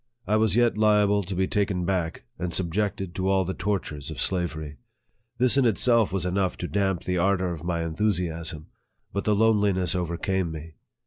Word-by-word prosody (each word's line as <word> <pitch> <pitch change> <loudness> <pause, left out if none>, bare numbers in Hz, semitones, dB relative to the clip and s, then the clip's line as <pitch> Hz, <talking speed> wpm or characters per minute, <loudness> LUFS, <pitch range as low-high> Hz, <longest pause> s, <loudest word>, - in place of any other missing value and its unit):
I 105 - +1
was 110 -1 +3
yet 120 -2 +3
liable 105 -1 +4
to 95 0 -5
be 95 +1 +1
taken 95 -3 0
back, 90 -4 -2 0.2
and 90 -1 -2
subjected 95 0 -1
to 95 +2 -1
all 95 -1 +2
the 95 - -3
tortures 90 -9 -3
of - - -7
slavery. 80 -5 -1 0.6
This 125 +2 +3
in 135 - +4
itself 115 -1 +3
was 95 -1 -1
enough 95 0 0
to 90 - -4
damp 95 -3 0
the 90 -1 -1
ardor 95 -1 +1
of 80 -2 -8
my 85 -1 -1
enthu 85 +7 0
siasm. 80 -3 -4 0.5
But 100 - -2
the 105 - +3
loneliness 100 -5 +2
overcame 90 0 -1
me. 80 0 -8
95 Hz, 185 wpm, -26 LUFS, 85-105 Hz, 0.6 s, liable